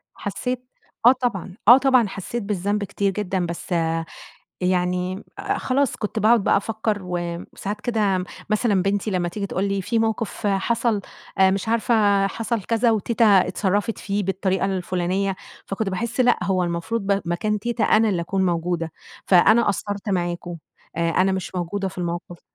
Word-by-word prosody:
حسيت 250 +5 -4 0.4
آه 245 - +10
طبعًا، 235 -9 -2
آه 245 +3 +10
طبعًا 260 -4 +4
حسيت 200 +4 -5
بالذنب 205 +1 -1
كتير 200 0 -1
جدًا 190 -2 -2
بس 170 +2 -5 0.9
يعني 180 +1 0 0.3
خلاص 270 0 0
كنت 215 +1 -3
باقعد 220 0 +4
بقى - - +4
أفكّر 215 +1 -1
و 180 -1 -3 0.4
ساعات 205 +1 -4
كده 205 -6 0 0.3
مثلًا 215 -3 +2
بنتي 200 +2 0
لمّا 180 -2 0
تيجي 200 +3 -4
تقول 190 0 -2
لي 200 -1 -1
في 230 +5 0
موقف 225 -1 -1
حصل 210 +2 +1 0.4
آآ 190 0 +6
مش 195 +3 -2
عارفة 215 -3 +3
حصل 225 +2 -2
كذا 230 +3 +2
وتيتة 230 +2 +1
اتصرفت 200 +1 +2
فيه 205 +1 -2
بالطريقة 190 0 0
الفلانية، 185 +1 -1 0.3
فكنت 195 +1 -2
باحس 230 +6 -2
لأ 250 - +5
هو 185 -2 +1
المفروض 175 +7 -2
ب 200 0 0
مكان 210 +5 -1
تيتة 235 +2 -1
أنا 220 +1 +4
اللي 180 -5 0
أكون 190 +2 0
موجودة، 170 -1 -1 0.3
فأنا 215 +5 +5
قصّرت 205 0 -2
معاكم 175 -2 -2 0.4
آآ 170 0 +1
أنا 185 +3 +2
مش 190 0 -4
موجودة 185 +2 -2
في 185 - -11
الموقف. 175 0 -4
200 Hz, 155 wpm, -23 LUFS, 185-220 Hz, 0.9 s, آه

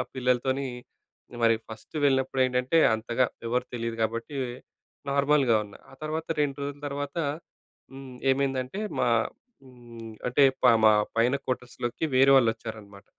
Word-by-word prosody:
పిల్లలతోని 130 +2 0 0.8
మరి 115 0 +5
ఫస్ట్ 110 +5 -12
వెళ్ళినప్పుడు 135 -1 +1
ఏంటంటే, 125 +5 +1 0.2
అంతగా 115 +3 0 0.2
ఎవరు 125 +2 0
తెలీదు 115 -1 -3
కాబట్టి, 115 +5 -3 0.7
నార్మల్‍గా 140 -3 +3
ఉన్నా. 100 - -14
ఆ - - -12
తర్వాత, 155 +1 -3
2 140 -2 0
రోజుల 145 0 -5
తర్వాత, 140 +1 -5 0.8
హ్మ్. 135 -1 -10 0.2
ఏమైందంటే 135 +4 -2 0.2
మా 125 - +2 0.6
హ్మ్, 120 -3 -12
అంటే 125 +3 +3 0.2
పామా 110 -3 +6 0.2
పైన 120 +3 +3
క్వార్టర్స్‌లోకి 125 +1 -3
వేరే 135 +1 +6
వాళ్ళు 120 -4 +5
వచ్చారనమాట. 105 -3 -10
125 Hz, 125 wpm, -27 LUFS, 115-135 Hz, 0.8 s, పామా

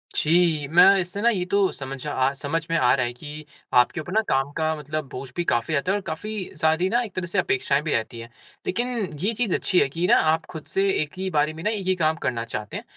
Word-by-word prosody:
जी, 160 -2 +2
मैं 180 +5 +6
इससे 180 +3 -4
न 235 - +2
ये 180 -2 -1
तो 200 -1 +3
समझ 135 +1 -7
अ 135 -2 +1
समझ 160 +2 -2
में 165 - +2
आ 125 -4 +4
रहा 130 -2 0
है 120 - -4
कि 150 +4 -9 0.3
आपके 125 +6 +3
ऊपर 175 +4 -7
न - - +5
काम 135 +1 +1
का 160 0 0
मतलब 150 0 -5
बोझ 130 +1 -7
भी 175 - -1
काफ़ी 120 +5 0
रहता 155 +6 +1
है। 200 - +1
और - - -5
काफ़ी 210 +4 -5
सारी 160 +4 +2
न - - -5
एक 200 - -12
तरह 185 -1 -2
से 180 +4 -4
अपेक्षाएँ 140 -3 +1
भी 155 - -2
रहती 115 +1 -2
हैं। 115 +1 -9 0.4
लेकिन 240 +6 0 0.4
ये 220 - +2
चीज़ 220 -3 0
अच्छी 185 - +2
है - - +3
कि 170 +6 -1
ना - - +6 0.2
आप 160 -1 -2
खुद 160 -3 -8
से 195 +1 +1
एक 150 -1 -4
ही 190 0 -2
बारे 150 -2 +1
में 160 +1 -9
ना 210 - +1
एक 210 -3 -3
ही 185 - +3
काम 160 -3 +1
करना 115 -2 -1
चाहते 110 -3 -5
हैं। - - -7
160 Hz, 265 wpm, -24 LUFS, 140-185 Hz, 0.4 s, मैं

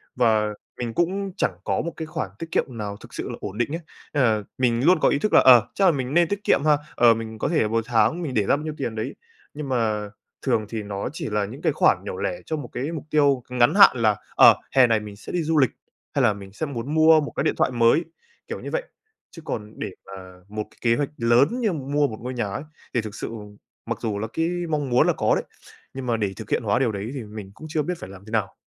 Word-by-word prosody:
và 110 -3 +2 0.3
mình 120 -2 -3
cũng 190 - -1
chẳng 95 - 0
có 95 - 0
một 170 - -4
cái 160 - -4
khoản 110 -9 -4
tiết 165 0 -7
kiệm 125 -7 -1
nào 100 -2 -4
thực - - -15
sự - - -5
là - - -4
ổn 100 - -6
định 120 +2 0
ấy. 170 - -5 0.3
Nên 145 - +2
là 110 -3 +2
mình 125 +1 +1
luôn 180 -1 +5
có - - +4
ý 140 - +1
thức 215 - -1
là, - - +8
ờ, 125 -3 +8
chắc 195 - +3
là 180 - +7
mình 135 -2 -3
nên 175 0 +4
tiết 200 +2 -3
kiệm - - +4
ha, 150 -1 +5 0.2
ờ, 120 -1 +6
mình 110 -1 -6
có - - 0
thể 165 - +2
là 110 - +2
một 115 +1 0
tháng 120 +9 +2
mình 150 -6 -3
để 110 - +3
ra - - +3
bao 150 - -5
nhiêu 155 - -4
tiền 120 -5 -3
đấy, 110 - -4 0.4
nhưng 150 -2 -6
mà 110 -4 0 0.3
thường 110 - +1
thì 110 -2 -4
nó 100 -1 -4
chỉ 160 - -4
là 105 -1 0
những 120 +7 -9
cái - - +1
khoản - - +3
nhỏ - - -5
lẻ 90 - -2
cho 160 - -2
một 140 -5 -6
cái 135 +6 -3
mục 160 -4 -5
tiêu 140 -4 +3
ngắn 125 +5 +3
hạn, 200 -8 +8
là, 110 -3 +3 0.2
ờ, - - +8 0.2
hè 130 -2 +7
này 115 -2 +2
mình 105 -1 -9
sẽ 100 - -9
đi 175 -2 0
du 160 +1 +1
lịch, 135 -5 +4 0.4
hay 140 - +2
là 110 -4 +4
mình 100 -1 -11
sẽ 160 - -3
muốn 140 0 -5
mua 160 0 +6
một 145 - -5
cái - - 0
điện 155 - +2
thoại - - +2
mới, 120 +6 +4 0.4
kiểu - - -5
như - - -7
vậy, - - -1 0.5
chứ 165 - -11
còn 105 -6 -5
để - - -3 0.2
mà 95 - -11 0.3
một 105 +1 -4
cái - - -24
kế 115 -1 +3
hoạch 145 -2 -1
lớn 120 +3 +4
như 215 -6 +1
mua 145 0 0
một 110 - -7
ngôi 125 +2 -4
nhà 120 -3 -1
ấy, 100 +8 -4 0.3
thì 115 - +1
thực 110 -1 -8
sự - - -5 0.6
mặc - - -3
dù 105 -2 -2
là 110 - -3
cái 165 0 0 0.2
mong 150 -3 -1
muốn 120 0 +4
là - - +3
có - - +2
đấy, - - -1 0.5
nhưng 130 -1 -6
mà 115 -2 +1
để 100 -3 -1
thực 110 -2 -9
hiện - - 0
hóa 100 +1 +1
điều 125 -4 +2
đấy 100 +3 -5
thì 130 - -5
mình 105 -2 -9
cũng 155 - -10
chưa 155 0 0
biết 180 - -2
phải - - -8
làm 95 0 -12
thế 110 - -11
nào. 110 -3 -1
120 Hz, 280 wpm, -24 LUFS, 110-150 Hz, 0.6 s, là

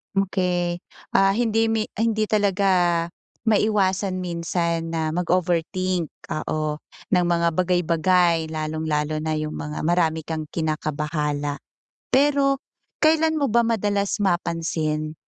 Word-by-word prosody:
Okey. 180 -3 0 0.3
Ah, 195 0 +4
hindi 225 0 +2
mi 225 -1 0
hindi 215 -1 +1
talaga 185 -5 +2 0.4
maiwasan 195 -3 +1
minsan 170 -1 -2
na 160 -1 0
mag-overthink, 180 +1 0 0.3
oo, 155 0 -2 0.3
ng 180 -3 +3
mga 170 -1 +2
bagay-bagay 175 -1 +2
lalong-lalo 155 -1 -2
na 155 0 -2
yung 155 0 -3
mga 150 0 -5
marami 160 -1 +1
kang 155 0 -4
kinakabahala. 150 -2 -2 0.5
Pero 275 0 +3 0.4
kailan 315 0 +3
mo 285 - +2
ba 235 0 +3
madalas 205 -2 0
mapansin 160 -4 -1
175 Hz, 105 wpm, -23 LUFS, 160-200 Hz, 0.5 s, Ah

